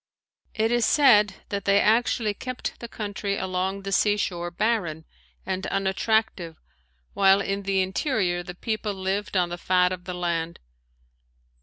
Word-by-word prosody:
It 220 +1 +1
is 240 -1 +2
said 210 -8 +5
that 200 -1 -3
they 200 0 +4
actually 220 0 +2
kept 255 +4 -6
the 235 - -7
country 205 -2 -4
along 190 +1 -2
the 195 - -4
sea 205 +2 +3
shore 175 -3 -2
barren 175 -5 -1 0.4
and 190 0 -3
unattractive 195 -3 0 0.5
while 195 0 +5
in 200 0 -2
the 195 -1 +1
interior 190 - -1
the 175 0 -9
people 215 +1 -3
lived 190 +1 -2
on 175 -1 +2
the 175 0 -6
fat 180 0 +2
of 180 -1 -6
the 180 -1 -5
land. 170 -1 -2
195 Hz, 150 wpm, -25 LUFS, 180-210 Hz, 0.5 s, said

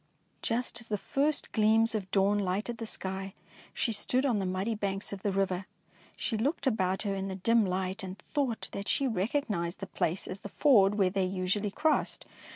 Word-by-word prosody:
Just 240 0 0
as 235 - -6
the 210 - -1
first 285 +8 0
gleams 220 +1 +4
of 200 -4 -3
dawn 200 +2 +3
lighted 205 +5 -2
the 225 - -3
sky, 190 -1 -3 0.4
she 235 - 0
stood 250 +5 +2
on 240 -6 +2
the 190 - -1
muddy 190 +5 -1
banks 200 -1 -2
of 195 - -6
the 200 - 0
river. 190 -1 0 0.5
She 225 - -1
looked 280 +6 -1
about 190 -6 +1
her 200 -2 -1
in 195 0 -3
the 190 - -4
dim 225 +2 +3
light 185 +2 -2
and 190 0 -6
thought 270 -4 -2
that 200 0 -5
she 275 - +2
recognised 205 -5 -1
the 195 - -4
place 180 -1 -1
as 185 - -5
the 200 - -8
ford 205 -6 +5
where 190 -3 +3
they 190 0 +1
usually 190 +3 -1
crossed. 305 +9 0
200 Hz, 195 wpm, -30 LUFS, 190-230 Hz, 0.5 s, ford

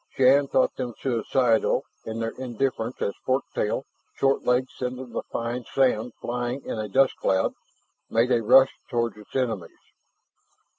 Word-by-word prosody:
Shann 135 +2 +5
thought 130 - +2
them 125 -3 -4
suicidal 120 -1 +2 0.2
in 110 0 -4
their 115 0 -1
indifference 125 -1 -2
as 100 - -1
fork 130 +1 +1
tail, 105 +5 -1 0.3
short 135 0 +2
legs 125 +1 +1
sending 125 0 -5
the - - -2
fine 120 +2 -3
sand 125 -3 +1
flying 125 +2 -3
in - - -4
a 105 - -2
dust 135 +5 +3
cloud, 95 0 +1 0.6
made 115 +3 +2
a 120 -2 +3
rush 130 +4 +6 0.2
toward 115 -4 0
its 105 -1 -15
enemies. 115 -8 -2
125 Hz, 150 wpm, -25 LUFS, 115-130 Hz, 0.6 s, rush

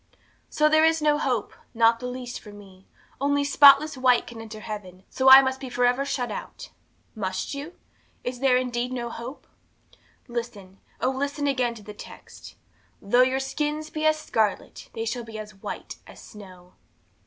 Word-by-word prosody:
'So 300 - +2
there 310 +1 +4
is 320 0 +3
no 300 -1 +2
hope, 250 -6 -1 0.2
not 230 0 +4
the 250 - -5
least, 250 -1 -6
for 210 - -13
me! 195 -2 -16 0.3
Only 285 0 +1
spotless 285 +1 +6
white 255 -2 +3
can 230 -2 -10
enter 220 -1 -9
heaven, 190 -4 -8
so 265 0 +3
I 265 +1 +11
must 265 0 -2
be 265 - -7
for 245 0 +1
ever 250 +3 +1
shut 265 -3 -2
out! - - -8 0.4
'Must 190 -1 -4
you? 290 +5 -7 0.5
Is 245 0 -4
there 260 -1 +3
indeed 250 -1 -2
no 240 -2 -4
hope? 240 +5 -8 0.8
'Listen, 230 -6 -7 0.2
oh, 255 - +1
listen 285 +2 -3
again 255 -4 0
to 215 - -12
the 210 - -9
text - - -13 0.4
"though 245 +5 +3
your 260 +1 +2
sins 300 +3 -3
be 310 - -4
as 310 0 +3
scarlet, 220 -8 -2
they 225 - -4
shall 235 +1 -3
be 225 -1 -9
as 210 -1 -8
white 195 - -8
as - - -14
snow." 185 -4 -14
250 Hz, 175 wpm, -25 LUFS, 220-275 Hz, 0.8 s, I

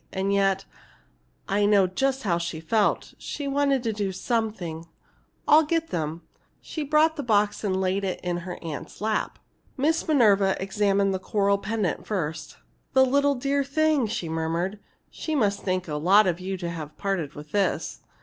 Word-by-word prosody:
And 195 +1 -1
yet 195 -1 +2 0.8
I 205 +1 +2
know 205 -2 +5
just 265 +8 -1
how 170 -5 +1
she 170 -2 -4
felt 205 +6 0
she 290 -2 -5
wanted 275 -2 +1
to 225 -2 -1
do 205 -2 -2
something! 190 -6 -3 0.6
I'll 305 +2 +7
get 325 +1 -1
them." 160 0 -3 0.4
She 315 - -6
brought 305 +2 +3
the - - -1
box 210 -4 +1
and 190 -2 0
laid 190 +1 0
it 190 -2 -2
in 175 -1 -1
her 180 +1 -6
aunt's 155 -3 -7
lap. 215 0 -1 0.4
Miss 315 +5 +1
Minerva 205 -10 +4
examined 195 0 +1
the 190 - -2
coral 200 +1 +1
pendant 205 -2 -2
first. 160 -7 -3 0.4
"The 265 - +6
dear 260 0 0 0.5
little - - +2
thing!" 310 -5 +3
she 210 -6 -3
murmured. 165 +5 -2 0.3
"She 315 - -3
must 205 -7 +1
think 185 -1 -1
a 155 - -4
lot 195 +7 +5
of 175 -2 0
you 190 +1 -4
to 175 -2 -4
have 155 -2 -7
parted 190 -7 -2
with 150 +1 -10
this!" 200 -1 -1
200 Hz, 170 wpm, -25 LUFS, 180-230 Hz, 0.8 s, I'll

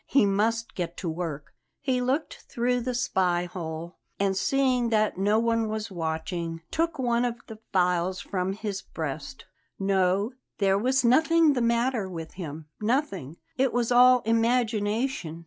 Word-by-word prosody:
He 275 -6 +4
must 225 +4 0
get 175 -2 -4
to 175 - -3
work. 160 -4 -5 0.3
He 260 -2 0
looked 265 +5 -2
through 245 +1 0
the 250 +1 -2
spy 180 -7 +1
hole, 170 -1 -6 0.2
and, 195 -1 +1
seeing 255 +2 +2
that 215 -4 +1
no 205 +2 +3
one 230 -1 +1
was 215 0 -4
watching, 165 0 -3
took 330 0 0
one 240 -2 +1
of 240 -1 0
the 220 -1 -10
files 180 0 +1
from 185 0 -2
his 205 -2 -4
breast. 160 - -6 0.3
No, 195 +2 +1 0.3
there 195 -1 +2
was 260 +3 +2
nothing 320 +5 +5
the 250 - -1
matter 235 -3 +1
with 165 -3 -7
him 160 -4 -7 0.2
nothing! 210 - -1 0.2
It 265 0 +2
was 240 0 0
all 250 0 +7
imagination. 225 -4 0
215 Hz, 150 wpm, -27 LUFS, 180-245 Hz, 0.3 s, all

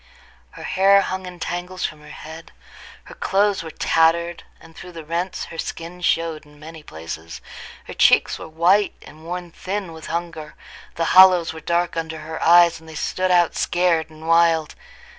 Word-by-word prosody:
Her - - -11
hair 195 +1 +4
hung 185 -1 -4
in 180 -1 -10
tangles 180 +2 -4
from 155 -1 -6
her 150 - -14
head; 160 +1 -11 0.5
her - - -13
clothes 200 0 0
were 165 - -8
tattered, 165 +2 +1 0.2
and 165 0 -17
through 180 -1 -11
the 165 -2 -9
rents 175 +3 -3
her 165 - -8
skin 170 +2 -6
showed 165 -3 0
in 150 -1 -20
many 160 +1 -11
places; 80 - -9 0.5
her - - -9
cheeks - - +3
were - - -8
white, 175 +6 +2
and 155 +1 -15
worn 175 0 -6
thin 190 -1 -5
with 160 0 -10
hunger; 165 -2 -5 0.4
the 165 - -1
hollows 185 -3 +6
were 160 - -9
dark 170 +1 -1
under 160 -1 -5
her 160 +1 -7
eyes, 170 -1 +5
and 160 0 -16
they 160 - -10
stood 185 +4 -2
out 175 -2 +3
scared 175 -2 +1
and 160 0 -12
wild. 165 -2 +3
165 Hz, 180 wpm, -21 LUFS, 160-180 Hz, 0.5 s, hollows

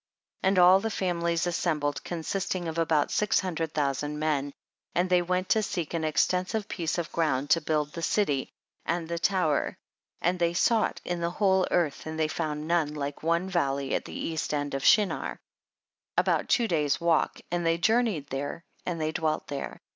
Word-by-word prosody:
23. - - +1
And 195 - +1
all 180 +1 +7
the 225 +3 -2
families 170 -4 0
assembkjd 150 -5 -1
consisting 175 +1 -3
of 165 +1 -3
about 160 -3 +2
six 210 - +2
hundred 165 -4 -3
thousand 145 0 -1
men, 150 -2 0 0.4
and 180 +1 +1
they 180 -1 +5
went 180 +1 -1
to 220 - +4
seek 175 -7 -3
an 165 -1 -1
extensive 185 +6 +1
piece 170 -5 -2
of 170 -1 -3
ground 145 -4 0
to 165 - +5
build 150 -1 -1
the 170 - -5
city 150 -7 +1 0.3
and 170 0 -2
the 170 0 -3
tower, 175 -6 +1 0.4
and 180 +1 0
they 170 0 +1
sought 225 +4 +2
in 175 -1 -2
the 170 - 0
whole 190 0 +2
earth 160 -3 0
and 160 0 -5
they 155 - +2
found 155 -1 -3
none 160 -3 +1
hke 145 -1 -4
one 170 +3 +1
valley 140 -7 0
at - - -1
the - - -9
east 160 -2 -2
of - - -14
the - - +2
land 145 0 -3
of 135 0 -2
Shinar, 210 -3 +3 0.8
about - - +2
two 235 -3 +3
days' 150 -6 +1
walk, 170 -2 +1
and 175 0 0
they 165 0 +2
journeyed 220 - +2
there 145 +5 -4 0.2
and 175 -2 -2
they 155 0 0
dwelt 155 -1 -1
there. 140 - -5
165 Hz, 190 wpm, -28 LUFS, 150-180 Hz, 0.8 s, all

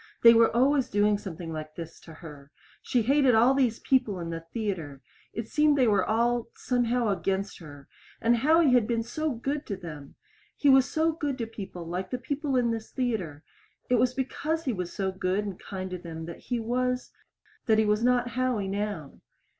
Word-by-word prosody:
They 230 0 +10
were 230 0 +5
always 265 +2 +3
doing 205 0 +2
something 170 -4 -7
like 155 0 -7
this 165 -1 -8
to 165 - -14
her. 150 -4 -12 0.3
She 245 -3 +1
hated 270 0 +4
all 240 +4 +5
these 250 -5 +2
people 250 -8 +1
in 170 -1 -5
the 165 - -3
theater. 185 - -3 0.3
It 225 0 -5
seemed 300 +1 +3
they 255 -3 +4
were 200 -3 +3
all, 235 +1 +1
somehow, 245 -2 0
against 195 0 -2
her. 145 -4 -12 0.3
And 235 +1 +3
Howie 310 +3 +4
had 245 -4 +4
been 230 -1 0
so 310 +7 -2
good 275 +5 -3
to 200 - -3
them! 150 -6 -9 0.4
He 285 - +2
was 265 0 +6
so 320 +1 +2
good 295 -4 -3
to 235 - -2
people 195 -6 -8
like 180 +3 -4
the 250 - -2
people 280 +2 -2
in 240 -2 +2
this 225 -1 -4
theater. 200 - -3 0.5
It - - +6
was 255 +1 +2
because 320 +5 -2
he 255 - 0
was 180 -3 -4
so 190 -1 -2
good 190 +2 -1
and 195 -3 -6
kind 190 -1 -6
to 180 - -4
them 160 -2 -7
that 170 0 -8
he 245 -2 0
was 250 +2 -1 0.6
that 220 -1 +4
he 220 - +3
was 210 +2 +1
not 245 0 +2
Howie 250 -5 -1
now. 200 -7 -4
225 Hz, 200 wpm, -27 LUFS, 185-255 Hz, 0.6 s, They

